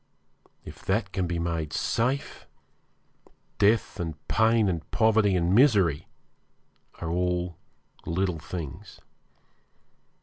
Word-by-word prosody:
If - - -11
that 95 0 0
can 95 -2 -1
be 85 0 -2
made 85 -2 -2
safe, 130 +5 -1 1.1
death 105 0 +2
and 80 -3 -3
pain 110 0 +3
and 85 -4 -3
poverty 110 -3 +3
and 90 0 +1
misery 100 - +4 0.9
are 80 - -3
all 90 0 -1 0.5
little 90 0 -1
things. 85 +4 -8
90 Hz, 100 wpm, -27 LUFS, 85-110 Hz, 1.1 s, misery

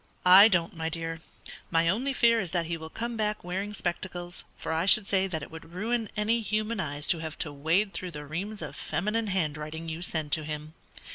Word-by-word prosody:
"I 190 +3 +10
don't, 175 -6 +1
my 160 0 -2
dear. 165 0 -3 0.5
My 165 0 +3
only 235 +11 +1
fear 235 -3 +4
is 185 -5 -2
that 170 0 0
he 170 +1 -2
will 160 -1 -8
come 235 +6 -4
back 210 -1 -1
wearing 190 +4 -3
spectacles, 175 -2 -3
for - - -3
I 165 +3 0
should 200 +1 +7
say 195 -1 +2
that 160 -5 -3
it - - -9
would 160 +1 -11
ruin 220 +3 -1
any 225 +2 +2
human 215 +1 -1
eyes 145 -3 -2
to 170 - +4
have 160 -1 -6
to 150 - -3
wade 165 +8 +1
through 185 - -4
the 150 -3 -7
reams 195 +8 -4
of - - -7
feminine 220 +2 -1
handwriting 160 -3 -2
you 160 +1 -5
send 160 -4 -2
to 155 - +3
him. 150 0 -6
175 Hz, 215 wpm, -28 LUFS, 160-210 Hz, 0.5 s, I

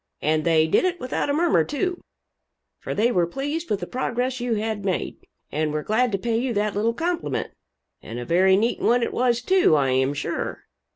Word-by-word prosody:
And 155 0 +1
they 160 -2 +4
did 160 - +2
it 365 -1 0
without 255 +3 -2
a - - +2
murmur, 315 - +3
too, 355 - -2 0.8
for - - -5
they 230 +4 +2
were 175 -6 +2
pleased 290 - -4
with 205 - -1
the - - -2
progress 255 0 -2
you 240 -1 -1
had 215 -1 -3
made, 190 -2 -2 0.3
and 155 +1 -1
were 150 0 -2
glad 240 +3 +1
to 195 - 0
pay 225 +3 -1
you 245 -2 -2
that 205 0 0
little 225 +3 0
compliment 345 +3 -2 0.5
and 115 - -8
a 120 - -5
very 190 +4 +4
neat 230 +4 0
one 240 0 +2
it - - -2
was, 240 -1 +1
too, 370 - +4
I 135 -3 +2
am 130 +2 +1
sure. - - -4
225 Hz, 210 wpm, -24 LUFS, 170-255 Hz, 0.8 s, they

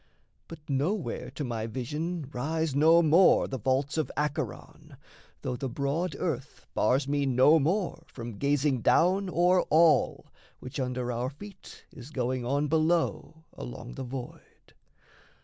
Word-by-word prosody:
But 155 -2 -12
nowhere 155 +8 -2
to 150 - -3
my 115 -3 -3
vision 150 +7 -4
rise 155 +4 -1
no 160 +4 +5
more 165 +4 +5
The 130 - -5
vaults 135 +6 0
of 155 - -2
Acheron, 150 +1 -4 0.5
though 125 - -2
the 135 +1 -4
broad 145 +8 -2
earth 145 -4 -4
Bars 135 +2 +2
me 145 -1 0
no 130 +5 +5
more 175 +6 -1
from 115 -4 -8
gazing 140 -2 +1
down 185 - +3
o'er 180 +1 +3
all 160 0 +3 0.3
Which 125 +2 -7
under 125 -1 -2
our 120 +2 -2
feet 195 +7 -13
is 140 -6 -11
going 130 -3 -2
on 140 +4 0
below 160 0 0
Along 120 0 -8
the 135 - -6
void. 125 0 -9
145 Hz, 140 wpm, -28 LUFS, 130-165 Hz, 0.5 s, no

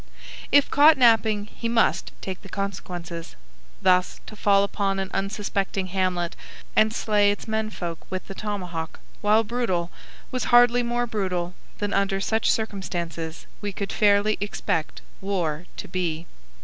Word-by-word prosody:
If 285 0 +5
caught 300 +2 +7
napping 220 -4 +4
he 230 +2 -5
must 230 -1 +2
take 190 -1 -5
the 195 - -12
consequences. 175 -4 -5 0.5
Thus, 180 -1 +3
to 215 - -10
fall 200 -1 +4
upon 200 -1 -1
an 190 -1 -3
unsuspecting 195 -1 -1
hamlet 180 -2 0 0.4
and 215 0 +5
slay 210 -2 +2
its 205 +2 -2
men 220 0 -1
folk 170 -5 -5
with 185 -1 -4
the - - -7
tomahawk, 180 -6 -4 0.2
while 215 +2 +4
brutal, 205 -7 -1 0.4
was 255 - -1
hardly 245 0 +6
more 240 0 0
brutal 185 -6 -2 0.2
than 205 -1 -2
under 195 -1 +1
such 220 +3 +1
circumstances 170 -6 -3 0.2
we 205 -1 -3
could 200 +1 -4
fairly 205 0 +3
expect 165 -6 -2 0.2
war 180 -4 -2
to - - -6
be. 170 -3 -2
200 Hz, 145 wpm, -25 LUFS, 180-215 Hz, 0.5 s, caught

